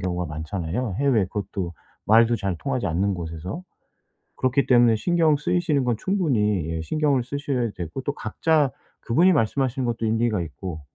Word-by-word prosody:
경우가 90 -1 -2
많잖아요. 85 +7 -3
해외 135 -8 +3
그것도 95 -2 -4 0.3
말도 115 +2 +5
잘 100 -4 -2
통하지 130 - -2
않는 95 +4 0
곳에서? 85 - -6 0.7
그렇기 130 +2 +1
때문에 120 -3 +5
신경 165 +4 +2
쓰이시는 150 -2 0
건 120 -2 +1
충분히 110 - 0
예 80 0 -3
신경을 145 - +1
쓰셔야 135 -3 -2
되고 85 +8 -5
또 145 - -2
각자 145 +6 +1 0.3
그분이 170 +11 +4
말씀하시는 130 -1 0
것도 115 -1 -1
일리가 110 -2 +1
있고 85 +1 -7
115 Hz, 360 characters per minute, -24 LUFS, 95-140 Hz, 0.7 s, 말도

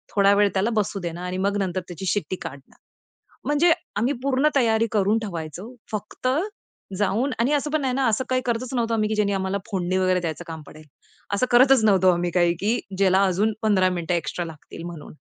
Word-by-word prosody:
थोडा 200 0 +5
वेळ 205 0 +4
त्याला 195 +4 +1
बसू 205 -2 -1
देणं 170 0 -5
आणि 180 +1 -4
मग 200 +2 0
नंतर 185 -2 -1
त्याची 180 +1 -7
शिट्टी 195 -1 -1
काढणं. 135 0 -9 0.7
म्हणजे 305 +4 +4 0.2
आम्ही 240 +7 +1
पूर्ण 275 +1 +2
तयारी 230 -3 +3
करून 210 0 +2
ठेवायचो 185 +3 -6 0.2
फक्त 215 +4 -4 0.7
जाऊन 215 +7 +1
आणि 240 +5 +2
असं 295 +1 0
पण 310 -2 +1
नाही 260 -2 0
ना, 270 0 +1
असं 225 +3 +1
काही 255 0 +1
करतच 245 +2 -2
नव्हतो 230 -1 0
आम्ही 215 -1 +1
की 215 - 0
ज्यांनी 205 -1 +1
आम्हाला 190 0 -1
फोडणी 185 -1 0
वगैरे 185 -1 +2
द्यायचं 165 +1 -4
काम 160 -1 -7
पडेल. 155 0 -13 0.5
असं 200 +5 +2
करतच 255 0 +6
नव्हतो 190 -3 +5
आम्ही 175 0 -1
काही 175 -1 +4
की 220 +5 +1 0.2
ज्याला 190 0 +4
अजून 200 +4 +1
15 195 -4 +3
मिनिटं 175 -1 -2
एक्स्ट्रा 170 +1 -3
लागतील 160 0 -10
म्हणून. 170 -4 -9
200 Hz, 195 wpm, -24 LUFS, 180-230 Hz, 0.7 s, करतच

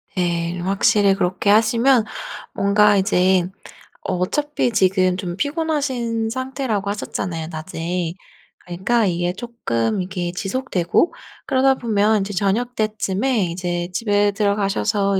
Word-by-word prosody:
네. 170 -2 -1
좀 175 - -4
확실히 195 0 +3
그렇게 185 +2 0
하시면 230 +3 +4 0.5
뭔가 205 +1 +4
이제 185 -2 +2 0.5
어 - - -2
어차피 270 +7 0
지금 185 -3 +2
좀 180 -1 -5
피곤하신 280 -7 -1
상태라고 260 -5 -2
하셨잖아요 180 -5 -4
낮에. 165 +1 -3 0.5
그러니까 190 +7 0
이게 175 -1 0
쪼끔 195 - -2
이게 180 -1 -3
지속되고 195 - 0 0.3
그러다 265 -1 +3
보면 215 -3 +2
이제 200 +1 -4
저녁때쯤에 215 +1 0
이제 175 0 -3
집에 205 +1 +2
들어가셔서 200 -1 +1
200 Hz, 285 characters per minute, -21 LUFS, 180-230 Hz, 0.5 s, 하시면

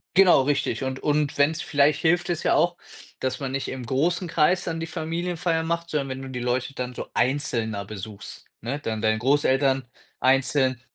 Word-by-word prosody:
Genau, 185 -6 +7
richtig 135 -3 0
und 130 0 -3
und 150 -1 0
wenn's 155 +3 +2
vielleicht 145 0 +2
hilft 175 +2 +2
es 170 -2 -1
ja - - +3
auch, 175 0 +2 0.5
dass 130 0 -1
man 135 -2 -4
nicht 135 - -2
im 130 -2 -6
großen 165 +9 0
Kreis 165 +2 +2
dann 165 -1 -3
die - - -2
Familienfeiern 165 +1 -2
macht, 170 0 -2
sondern 140 -3 -1
wenn 130 0 -5
du 135 - -7
die 125 -1 -5
Leute 125 +3 -1
dann 125 0 -4
so - - -6
einzelner 120 -6 0
besuchst, 105 0 -9 0.2
ne, 125 +5 -3
dann 110 -5 -3
deine 110 -1 +2
Großeltern 135 0 +2 0.3
einzeln, 130 -1 +2
140 Hz, 185 wpm, -25 LUFS, 130-160 Hz, 0.5 s, Genau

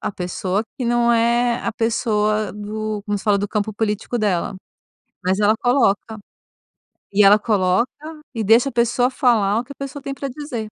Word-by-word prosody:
a - - -2
pessoa 185 +2 -2 0.2
que 250 - -2
não 240 0 +2
é 235 +1 +2
a - - -1
pessoa 215 -2 0
do 210 0 -5
como 205 -1 -2
se - - -12
fala? 205 -2 +3
Do 205 +1 -1
campo 210 0 -2
político 215 +2 -2
dela. 200 -3 0 0.7
Mas 185 +2 0
ela 210 +1 +4
coloca. 225 -4 +1 0.9
E 205 +1 +5
ela 200 +2 +7
coloca 205 +1 +1 0.5
e 225 - -2
deixa 230 +6 +4
a - - -10
pessoa 240 +2 +1
falar 225 -6 +2
o - - -3
que 270 - -14
a - - -9
pessoa 275 +1 -6
tem 275 0 -5
pra 275 +1 -5
dizer. 255 -4 -5
220 Hz, 185 wpm, -20 LUFS, 205-240 Hz, 0.9 s, ela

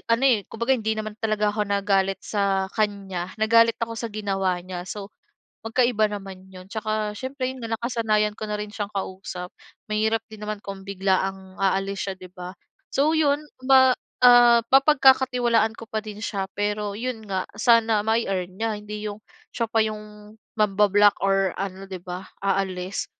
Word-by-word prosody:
ano, 230 +4 +3
eh, 240 -6 +4
kumbaga 235 +4 0
hindi 220 -2 -1
naman 215 -1 -4
talaga 215 -1 +1
ako 210 - +1
nagalit 195 -1 +1
sa 200 -2 0
kanya, 195 -4 -2
nagalit 230 +1 +5
ako 230 0 -2
sa 230 - -3
ginawa 195 -3 -1
niya. 180 -1 -6
So, 205 +1 -6 0.5
magkaiba 225 -1 +2
naman 195 -2 -8
'yon. 185 0 -11
Tsaka 215 -1 -2
siyempre 260 +3 -4
'yon 260 -1 -9
nga, 225 0 -2
nakasanayan 220 -3 0
ko - - -4
na 210 - -2
rin 210 - -5
siyang 205 -2 -4
kausap. 185 -2 -5 0.4
Mahirap 220 +1 +1
din 215 -1 -11
naman 210 0 -4
kung 195 -1 -7
biglaang 190 -1 -1
aalis 195 +1 0
siya, 195 - -3
'di 185 -1 -12
ba? 180 +1 -8 0.4
So 295 +3 +3
'yon, 295 -1 +2 0.2
ma 260 -1 +6 0.3
ah, 240 -1 +8
mapagkakatiwalaan 260 -5 +4
ko 230 - -9
pa 220 - -1
din 210 -1 -8
siya 195 -4 -2
pero 205 0 -2
'yon 240 -2 -4
nga, 190 -1 -2
sana 230 -2 +4
mai-earn 195 -5 0
niya, 220 -1 -2
hindi 210 0 -6
'yong 205 +1 -8 0.3
siya 230 -2 0
pa 225 - +1
'yong, 210 -1 -8 0.2
mangba-block 205 0 +4
or 195 -2 +2
ano, 195 0 -5
'di 185 -2 -7
ba? 180 +1 -6 0.2
Aalis. 190 -1 -1
210 Hz, 165 wpm, -24 LUFS, 195-230 Hz, 0.5 s, ah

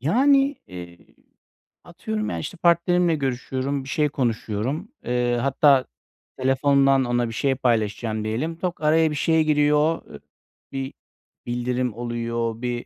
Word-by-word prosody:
Yani, 275 - +3
eee, 85 -1 -10 0.9
atıyorum 215 +5 -4
ya, - - -3
işte, 180 - -6
partnerimle 170 0 +3
görüşüyorum, 135 0 -2
bir 135 - -10
şey 150 -1 +1
konuşuyorum. 125 - -2 0.2
Eee, 120 0 0
hatta 140 0 +4 0.5
telefondan 135 0 +3
ona 120 -1 0
bir - - -7
şey 135 +3 0
paylaşacağım 110 -3 -1
diyelim. 130 +10 -2
Tık, 175 -1 -4
araya 160 +1 +3
bir 150 - -3
şey 160 +2 +2
giriyor. 150 +1 +2
I - - -10 0.5
bir 135 -1 -4 0.5
bildirim 125 0 -2
oluyor, 115 -1 -3
bir 120 -1 -3
135 Hz, 130 wpm, -23 LUFS, 120-155 Hz, 0.9 s, hatta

